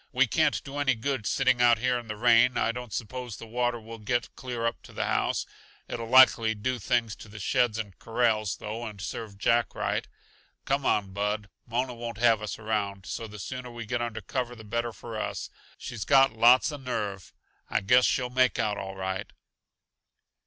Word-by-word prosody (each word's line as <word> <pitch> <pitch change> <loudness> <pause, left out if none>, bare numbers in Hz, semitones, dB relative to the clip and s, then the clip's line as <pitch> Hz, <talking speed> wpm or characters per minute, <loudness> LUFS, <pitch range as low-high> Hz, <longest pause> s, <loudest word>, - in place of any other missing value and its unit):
"We - - +4
can't - - +1
do 140 +1 -6
any 135 -3 +2
good 115 -1 -2
sitting 125 +3 +2
out 120 -1 +6
here 125 +1 +1
in 120 - -11
the 110 - -4
rain. 120 +2 +5
I - - +2
don't 125 -1 -7
suppose 125 0 -5
the - - -9
water 120 +1 -1
will 115 +1 -10
get 120 +3 -2
clear 120 -3 -4
up 115 - -1
to - - -14
the - - -2
house; - - 0 0.4
it'll 115 -1 -5
likely 120 -3 +6
do 125 +4 -2
things 115 0 0
to - - -11
the 105 - -11
sheds 120 +2 +1
and 105 -4 -5
corrals, 110 -3 +1
though, 110 +3 -5
and 105 -3 -7
serve 100 +2 -6
Jack 115 +3 +2
right. - - -1 0.6
Come 140 0 0
on, 100 -2 +1
Bud. 105 +1 -2 0.2
Mona 125 +2 -1
won't 115 -1 -6
have 115 -2 +4
us 105 - -4
around, 100 -3 -2
so 115 - -5
the 105 0 -10
sooner 125 +5 -6
we 120 -1 -7
get 120 +2 -2
under 115 -2 -3
cover 125 -2 -3
the 110 - -11
better 115 +2 -2
for 115 -1 -7
us. - - -4 0.3
She's 110 -4 -5
got 135 -1 +5
lots 120 +6 +5
uh 145 - -5
nerve; 105 -8 -4 0.4
I - - +1
guess 125 +6 +5
she'll 125 -2 0
make 130 -2 +3
out 105 -1 0
all 95 0 -6
right." 95 0 -4
115 Hz, 200 wpm, -28 LUFS, 105-125 Hz, 0.6 s, out